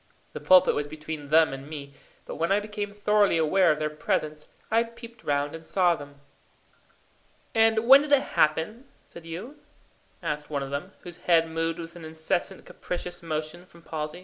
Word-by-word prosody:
The - - -5
pulpit 185 0 +6
was 145 0 -2
between 155 -1 -7
them 160 -2 +5
and 135 +2 -8
me, 140 -2 -8 0.3
but - - -7
when 165 +3 0
I 200 - +4
became 210 -1 -5
thoroughly 205 -2 +2
aware 170 +3 +4
of 150 - 0
their 155 0 -2
presence, 150 0 -2 0.2
I 225 +1 +4
peeped 235 0 -9
round 145 0 0
and 165 0 -8
saw 180 +1 +2
them. 145 -3 -10 1.3
"And 225 0 +3
when 270 +2 +10
did 295 0 -5
it 285 - +7
happen, 160 - +1 0.2
said 165 -1 -13
you?" 215 - -8 0.6
asked 150 0 -3
one 145 -2 -2
of 135 - -7
them, 155 +8 -4
whose 175 -2 -10
head 165 -2 +3
moved 165 0 -2
with 165 0 -8
an 170 - -10
incessant 160 +4 -3
capricious 175 0 -6
motion 155 +1 -4
from 170 -1 -18
palsy. 155 +1 -5
165 Hz, 180 wpm, -26 LUFS, 155-200 Hz, 1.3 s, when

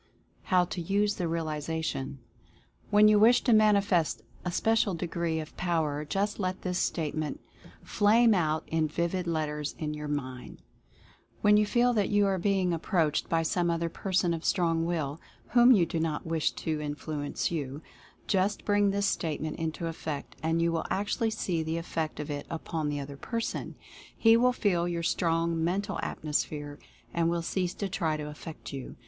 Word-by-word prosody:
HOW 180 -2 +3
TO 175 0 -5
USE 205 +4 +1
THE 175 - -1
REALIZATION. 160 -3 -3 0.7
When 210 +1 +6
you 210 -1 +6
wish 235 +3 +6
to 245 - +4
manifest 200 -6 +3 0.2
a 180 - -2
special 215 0 +2
degree 165 -1 -2
of 155 -1 -8
Power 160 -4 0
just 200 +6 -1
let 185 -1 -2
this 180 -1 -1
Statement 155 -2 -2 0.4
flame 225 +2 +4
out 160 -4 +1
in 160 -1 0
vivid 170 +3 -2
let 160 -2 0
ters 150 0 -4
in 150 -1 -3
your 150 0 -5
mind. 130 -4 -5 0.8
When 210 0 +5
you 210 0 +4
feel 245 +2 +3
that 210 -4 +1
you 205 -1 +3
are 195 -1 +1
be 195 +1 +1
ing 180 -1 +1
approached 165 -2 0
by 165 0 +2
some 175 +1 +1
other 170 0 0
person 180 -1 0
of 165 0 -4
strong 165 -3 +1
will, 160 -3 -2 0.3
whom 240 +1 +6
you 195 -8 +6
do 165 - -3
not 160 -2 -2
wish 160 -1 +1
to 155 -2 -3
influence 150 0 -3
you, 145 -2 -4 0.4
just 195 +1 0
bring 205 -1 +3
this 200 +1 0
Statement 155 -5 -2
into 165 +1 -3
effect, 160 -3 -5
and 165 +1 +1
you 170 - +2
will 165 -1 -2
actually 205 +3 0
see 185 -6 -1
the 160 +1 -2
effect 160 -2 -3
of 150 0 -4
it 145 0 -5
upon 160 -2 -3
the 145 0 -2
other 140 0 -7
person. 230 - -4 0.4
He 225 0 +6
will 250 +2 +4
feel 180 -8 +1
your 170 -1 -2
strong 165 -1 +1
Mental 195 +4 -1
Atmosphere 145 -1 -3 0.3
and 170 -1 +2
will 170 0 -1
cease 180 +1 -1
to 200 - -2
try 165 -5 -1
to 150 0 -5
affect 150 0 -9
you. 135 -2 -7
170 Hz, 175 wpm, -29 LUFS, 155-195 Hz, 0.8 s, When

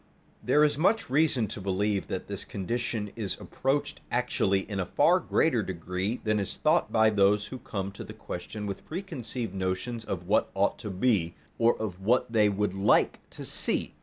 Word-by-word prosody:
There 150 - +4
is 150 -1 +2
much 200 - +2
reason 140 -5 +3
to 105 - -5
believe 100 +1 0
that - - -4
this - - -5
condition 105 +1 -3
is 105 -5 -3
approached 145 +2 -2
actually 115 -6 +1
in 100 0 -5
a 95 - 0
far 175 - +4
greater 160 -7 +2
degree 95 +4 -3
than 110 -2 +1
is 100 - -2
thought 155 +3 +2
by 110 -1 +4
those 105 0 +3
who 130 - -7
come 100 -4 -4
to 100 - -8
the - - -9
question 105 +1 -6
with 100 -1 -5
preconceived 135 - -5
notions 95 +5 -2
of 90 -5 -4
what 100 +4 +2
ought 100 +1 +1
to 105 - -5
be, 95 -4 +1 0.2
or 115 +1 +3
of 100 -5 -4
what 115 +3 +2
they 105 -2 +5
would 100 -1 0
like 95 +2 +3
to - - -8
see. - - -1
105 Hz, 185 wpm, -28 LUFS, 95-125 Hz, 0.2 s, they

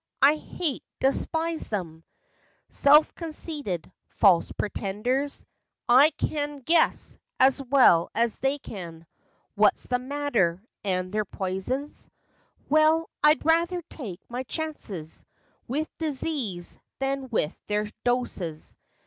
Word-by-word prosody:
I 290 +3 +7
hate, 305 -2 -4 0.2
despise 320 +4 0
them! 165 -6 -4 0.7
Self 300 +2 +5
conceited, 305 - -4 0.2
false 185 -5 +4
pretenders; 230 +8 -2 0.4
I 260 +5 +7
can 290 -2 -3
' - - -32
guess 330 +1 +2
' - - -51
as 270 +1 +4
well 255 -11 +5
as 230 0 +1
they 270 +1 +1
can 170 - -9 0.5
What's - - +3
the 250 0 0
matter; 250 -10 0 0.2
and 185 -2 -1
their 215 0 +1
poisons— 195 +11 -4 0.6
Well, 310 +2 +3
I'd 300 0 +5
rather 340 +2 +2
take 205 - -7
my 245 +1 -4
chances 255 - -5 0.4
With 300 +6 -1
disease 270 - -3 0.2
than 270 -1 -2
with 170 -9 0
their 210 0 0 0.2
doses. 205 -10 -2
265 Hz, 115 wpm, -26 LUFS, 195-300 Hz, 0.7 s, I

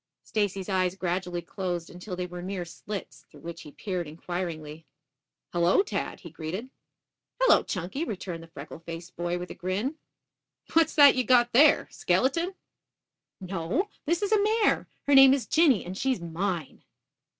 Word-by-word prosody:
Stacy's 200 -3 -1
eyes 185 -2 +1
gradually 180 -1 -2
closed 175 -2 -4
until 180 +2 -7
they 180 0 -3
were 180 0 -7
mere 185 -1 -4
slits, 195 +3 -8
through - - -16
which 170 0 -7
he 150 - -11
peered 180 -2 -4
inquiringly. 160 -1 -5 0.7
"Hullo, 175 - +4
Tad," - - -4
he 170 - -10
greeted. 180 +11 -5 0.7
"Hello, - - +6
Chunky," 190 - -4
returned 185 - -5
the 165 - -12
freckle 155 -1 -10
faced 170 +1 -9
boy 175 +1 -2
with 180 0 -6
a - - -5
grin. 205 - -2 0.8
"What 325 -1 +4 0.2
you 255 - +1
got 240 0 +4
there, 285 +4 +6
a - - -24
skeleton?" 270 - +1 0.8
"No; 190 - -2 0.2
this 340 +5 +1
is 405 - -1
a 430 -2 +4
mare. 430 +1 +2 0.2
Her 285 - +3
name 270 0 +9
is 270 - -3
Jinny 310 - +3
and 180 +2 -6
she's 260 +2 0
mine." 170 -1 -3
185 Hz, 160 wpm, -27 LUFS, 175-260 Hz, 0.8 s, name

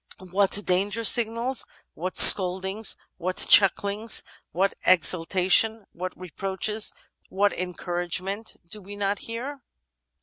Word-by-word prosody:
What 200 +1 +1
danger 200 +5 -2
signals, 235 +3 +1 0.3
what 180 +3 -6
scoldings, 190 +3 +6 0.2
what 185 +1 -4
chucklings, 205 +2 +2 0.3
what 195 +3 -1
exultation, 185 +5 +2
what 180 +1 -8
reproaches, 195 +4 -3 0.4
what 200 +1 0
encouragement 180 +3 -4
do 210 - -8
we 200 +2 -11
not 205 0 -3
hear? 260 +5 -8
195 Hz, 100 wpm, -24 LUFS, 185-215 Hz, 0.4 s, scoldings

